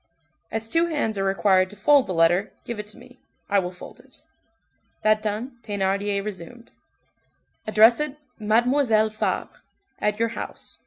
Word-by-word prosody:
"As 225 Hz, 0 st, -3 dB
two 330 Hz, +7 st, +2 dB
hands 290 Hz, -10 st, -1 dB
are -, -, 0 dB
required 190 Hz, -1 st, +3 dB
to 205 Hz, -, -11 dB
fold 270 Hz, +6 st, +4 dB
the 185 Hz, -, -2 dB
letter, 175 Hz, +4 st, +3 dB
give 235 Hz, -3 st, -5 dB
it 210 Hz, -, -6 dB
to 210 Hz, -, -10 dB
me, 250 Hz, +1 st, -16 dB, 0.3 s
I 200 Hz, -, +5 dB
will 180 Hz, -2 st, -2 dB
fold 180 Hz, -, -12 dB
it." -, -, -14 dB, 0.8 s
That 215 Hz, 0 st, +3 dB
done, 225 Hz, +4 st, -4 dB
Thénardier 200 Hz, -1 st, -1 dB
resumed:— 210 Hz, +4 st, -8 dB, 1.0 s
"Address 220 Hz, +3 st, +6 dB
it, 300 Hz, -1 st, -3 dB, 0.2 s
'Mademoiselle 220 Hz, 0 st, +2 dB
Fabre,' 215 Hz, -, -3 dB, 0.4 s
at 210 Hz, 0 st, 0 dB
your 230 Hz, +1 st, +1 dB
house. 230 Hz, -, -8 dB
215 Hz, 155 wpm, -24 LUFS, 200-235 Hz, 1.0 s, Address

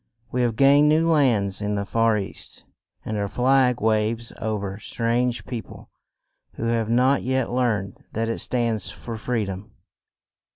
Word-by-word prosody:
We 125 Hz, -, 0 dB
have 120 Hz, -2 st, +1 dB
gained 140 Hz, +4 st, +5 dB
new 160 Hz, +2 st, +3 dB
lands 120 Hz, -12 st, +2 dB
in 105 Hz, 0 st, -1 dB
the 100 Hz, 0 st, -2 dB
far 115 Hz, 0 st, +2 dB
east, 100 Hz, -2 st, -6 dB, 0.4 s
and 110 Hz, -, -3 dB
our 100 Hz, -, -1 dB
flag 125 Hz, +2 st, +2 dB
waves 110 Hz, +1 st, +1 dB
o 110 Hz, -1 st, -1 dB
ver 100 Hz, 0 st, -5 dB
strange 120 Hz, +2 st, -1 dB
peo 120 Hz, -3 st, -4 dB
ple -, -, -14 dB, 0.7 s
who -, -, -6 dB
have 115 Hz, -1 st, 0 dB
not 130 Hz, +4 st, +3 dB
yet 130 Hz, -1 st, -1 dB
learned 110 Hz, -6 st, -1 dB
that 115 Hz, +1 st, -1 dB
it 115 Hz, -, -2 dB
stands 115 Hz, -6 st, -1 dB
for 115 Hz, +3 st, -7 dB
free 110 Hz, 0 st, -1 dB
dom. 95 Hz, +2 st, -7 dB
115 Hz, 165 wpm, -24 LUFS, 105-125 Hz, 0.7 s, gained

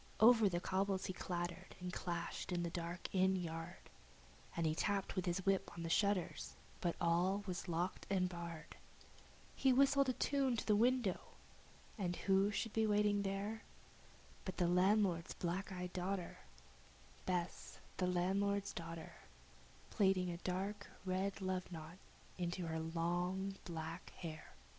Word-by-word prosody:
Over 225 Hz, -2 st, +8 dB
the 175 Hz, -2 st, 0 dB
cobbles 190 Hz, +1 st, 0 dB
he 185 Hz, -, -2 dB
clattered 175 Hz, +1 st, -4 dB
and 180 Hz, 0 st, -4 dB
clashed 170 Hz, 0 st, -3 dB
in 175 Hz, -1 st, 0 dB
the 170 Hz, -, -2 dB
dark 170 Hz, 0 st, -4 dB
inn 190 Hz, 0 st, +4 dB
yard, 165 Hz, -1 st, -5 dB, 0.7 s
He 160 Hz, -2 st, +2 dB
tapped 200 Hz, +4 st, 0 dB
with 185 Hz, -2 st, -1 dB
his 175 Hz, +2 st, 0 dB
whip 195 Hz, -1 st, +2 dB
on 170 Hz, -, -4 dB
the 165 Hz, -, -2 dB
shutters, 185 Hz, -6 st, +1 dB, 0.2 s
but 175 Hz, -5 st, 0 dB
all 180 Hz, +4 st, +2 dB
was 185 Hz, -1 st, -4 dB
locked 175 Hz, +2 st, -1 dB
and 185 Hz, -2 st, +3 dB
barred, 170 Hz, -3 st, -7 dB, 0.8 s
He 265 Hz, -, +4 dB
whistled 275 Hz, +1 st, +5 dB
a -, -, +2 dB
tune 270 Hz, -2 st, +1 dB
to -, -, -2 dB
the 210 Hz, -, +4 dB
window, 235 Hz, -3 st, +3 dB, 0.8 s
and 175 Hz, -3 st, 0 dB
who 195 Hz, +2 st, +3 dB
should 210 Hz, +1 st, -2 dB
be 220 Hz, -1 st, +3 dB
waiting 205 Hz, -1 st, +3 dB
there 200 Hz, +3 st, -2 dB, 0.8 s
But 185 Hz, -, -5 dB
the 175 Hz, -, +3 dB
landlord's 185 Hz, -1 st, +3 dB
black 185 Hz, +3 st, -2 dB
eyed 180 Hz, -1 st, -4 dB
daughter 185 Hz, 0 st, -2 dB, 0.9 s
Bess, 180 Hz, -1 st, -2 dB, 0.2 s
the 180 Hz, -, +1 dB
landlord's 195 Hz, +3 st, +1 dB
daughter 165 Hz, -1 st, -6 dB, 0.8 s
Plaiting 190 Hz, -3 st, +3 dB
a 170 Hz, -, -4 dB
dark 195 Hz, +3 st, -3 dB, 0.2 s
red 190 Hz, +2 st, -1 dB
love 185 Hz, -1 st, -2 dB
knot 165 Hz, +2 st, -8 dB, 0.4 s
into 175 Hz, 0 st, -1 dB
her 160 Hz, 0 st, -2 dB
long 175 Hz, +4 st, -1 dB
black 165 Hz, 0 st, -5 dB
hair. 160 Hz, -2 st, -7 dB
185 Hz, 145 wpm, -39 LUFS, 175-200 Hz, 0.9 s, Over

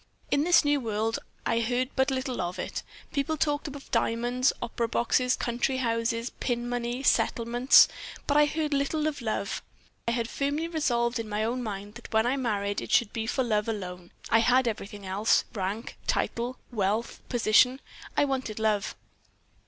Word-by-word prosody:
In 285 Hz, -, +3 dB
this 345 Hz, -2 st, +5 dB
new 290 Hz, 0 st, +3 dB
world 225 Hz, -1 st, -1 dB, 0.3 s
I 230 Hz, -, +2 dB
heard 245 Hz, +2 st, 0 dB
but 265 Hz, 0 st, +3 dB
little 260 Hz, -4 st, -2 dB
of 175 Hz, 0 st, -3 dB
it. -, -, -4 dB, 0.3 s
People 305 Hz, +2 st, 0 dB
talked 295 Hz, 0 st, 0 dB
of 285 Hz, -1 st, -9 dB
diamonds, 240 Hz, +2 st, +2 dB
opera 235 Hz, 0 st, -2 dB
boxes, 245 Hz, +2 st, +2 dB
country 245 Hz, +2 st, -1 dB
houses, 230 Hz, -1 st, -1 dB
pin 240 Hz, -1 st, -1 dB
money, 245 Hz, +1 st, -2 dB
settlements; 240 Hz, 0 st, +5 dB, 0.4 s
but 290 Hz, -, +1 dB
I 295 Hz, 0 st, +6 dB
heard 305 Hz, 0 st, -1 dB
little 285 Hz, +2 st, 0 dB
of 300 Hz, -3 st, -2 dB
love. 215 Hz, -3 st, -2 dB, 0.5 s
I -, -, +3 dB
had 235 Hz, -1 st, -1 dB
firmly 285 Hz, +6 st, -1 dB
resolved 240 Hz, -7 st, 0 dB
in 225 Hz, -1 st, -5 dB
my 210 Hz, +1 st, -1 dB
own 240 Hz, +3 st, -1 dB
mind 205 Hz, -2 st, -5 dB
that 235 Hz, +1 st, -11 dB
when 220 Hz, +1 st, +3 dB
I 250 Hz, +3 st, +2 dB
married 205 Hz, -6 st, -1 dB
it -, -, -7 dB
should 235 Hz, -4 st, +3 dB
be 225 Hz, -1 st, -3 dB
for 260 Hz, -, +1 dB
love 215 Hz, -3 st, 0 dB
alone. 180 Hz, -5 st, -5 dB, 0.2 s
I 225 Hz, -, +6 dB
had 245 Hz, +2 st, +4 dB
everything 205 Hz, -2 st, -4 dB
else 195 Hz, +4 st, +2 dB
rank, 205 Hz, +2 st, -4 dB
title, 240 Hz, +2 st, -1 dB
wealth, 215 Hz, +1 st, -1 dB
position. 245 Hz, +2 st, +4 dB, 0.4 s
I -, -, +5 dB
wanted 260 Hz, -6 st, -2 dB
love. 215 Hz, -2 st, 0 dB
235 Hz, 170 wpm, -28 LUFS, 220-265 Hz, 0.5 s, I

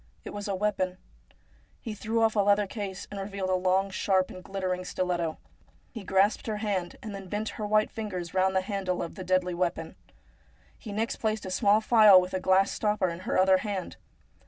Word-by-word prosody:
It -, -, -8 dB
was 205 Hz, 0 st, -5 dB
a 200 Hz, -, -1 dB
weapon. 185 Hz, -2 st, -1 dB, 0.8 s
He 225 Hz, -, -6 dB
drew 225 Hz, +2 st, -1 dB
off 225 Hz, 0 st, +2 dB
a -, -, +2 dB
leather 205 Hz, +1 st, +4 dB
case, 195 Hz, -2 st, -6 dB
and 200 Hz, -, -5 dB
revealed 195 Hz, -1 st, -3 dB
a -, -, +2 dB
long, 185 Hz, +1 st, +1 dB
sharp, 190 Hz, -1 st, +1 dB
and 185 Hz, -, -10 dB
glittering 185 Hz, -1 st, -3 dB
stiletto. 175 Hz, -3 st, -2 dB, 0.5 s
He 225 Hz, -4 st, -8 dB
grasped 195 Hz, +4 st, +2 dB
her 215 Hz, -1 st, -2 dB
hand, 200 Hz, -5 st, -2 dB
and 215 Hz, -2 st, -6 dB
then 195 Hz, -1 st, -8 dB
bent 210 Hz, +3 st, -2 dB
her 210 Hz, -, -5 dB
white 215 Hz, 0 st, +2 dB
fingers 185 Hz, -6 st, -5 dB
round 190 Hz, 0 st, +2 dB
the 190 Hz, -, +3 dB
handle 190 Hz, -2 st, -2 dB
of 170 Hz, -, -6 dB
the 185 Hz, -, -7 dB
deadly 185 Hz, 0 st, +1 dB
weapon. 180 Hz, 0 st, -2 dB, 0.8 s
He 220 Hz, -, -9 dB
next 220 Hz, +3 st, -2 dB
placed 215 Hz, -2 st, -2 dB
a 185 Hz, -, -5 dB
small 205 Hz, +2 st, +3 dB
phial 215 Hz, -4 st, +7 dB
with 180 Hz, 0 st, -3 dB
a 185 Hz, -, 0 dB
glass 190 Hz, +1 st, +3 dB
stopper 210 Hz, -3 st, 0 dB
in 170 Hz, 0 st, -6 dB
her -, -, +1 dB
other 190 Hz, 0 st, +5 dB
hand. 195 Hz, -2 st, -4 dB
195 Hz, 205 wpm, -28 LUFS, 185-210 Hz, 0.8 s, phial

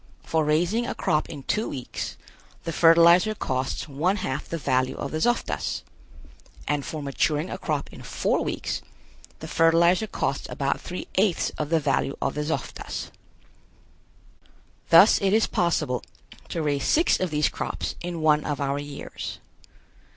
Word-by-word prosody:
For 160 Hz, -1 st, +1 dB
raising 175 Hz, +10 st, +1 dB
a -, -, -3 dB
crop 150 Hz, -, 0 dB
in 145 Hz, -4 st, -8 dB
two 215 Hz, +9 st, -1 dB
weeks 130 Hz, -3 st, -5 dB, 0.5 s
the 165 Hz, -, -3 dB
fertilizer 170 Hz, +6 st, +6 dB
costs 130 Hz, -2 st, -2 dB
one 155 Hz, +7 st, 0 dB
half 185 Hz, -9 st, -4 dB
the 165 Hz, -, -2 dB
value 130 Hz, -3 st, 0 dB
of 140 Hz, -, -5 dB
the 155 Hz, -, -2 dB
zoftas, 240 Hz, +8 st, 0 dB, 0.8 s
and 145 Hz, -1 st, 0 dB
for 155 Hz, +1 st, -5 dB
maturing 150 Hz, +4 st, 0 dB
a 185 Hz, -, -5 dB
crop 150 Hz, -5 st, -3 dB
in -, -, -10 dB
four -, -, 0 dB
weeks -, -, -3 dB, 0.6 s
the -, -, -6 dB
fertilizer 170 Hz, +5 st, +4 dB
costs 135 Hz, -8 st, -2 dB
about 140 Hz, -1 st, -1 dB
three 180 Hz, -, -6 dB
eighths 195 Hz, -4 st, +2 dB
of 150 Hz, -, -4 dB
the 165 Hz, 0 st, +3 dB
value 140 Hz, -2 st, 0 dB
of -, -, -1 dB
the 150 Hz, -, -2 dB
zoftas. 160 Hz, +2 st, -4 dB, 1.8 s
Thus 165 Hz, +6 st, +7 dB
it 195 Hz, 0 st, +2 dB
is 220 Hz, +1 st, +4 dB
possible 150 Hz, -8 st, 0 dB, 0.5 s
to 165 Hz, -, -2 dB
raise 145 Hz, -2 st, 0 dB
six 330 Hz, +3 st, +3 dB
of 185 Hz, -, 0 dB
these 150 Hz, -1 st, +2 dB
crops -, -, -3 dB
in 175 Hz, -2 st, -4 dB
one 150 Hz, -1 st, +4 dB
of 145 Hz, -1 st, -3 dB
our 140 Hz, 0 st, -1 dB
years. 145 Hz, -1 st, -7 dB
155 Hz, 155 wpm, -25 LUFS, 145-175 Hz, 1.8 s, Thus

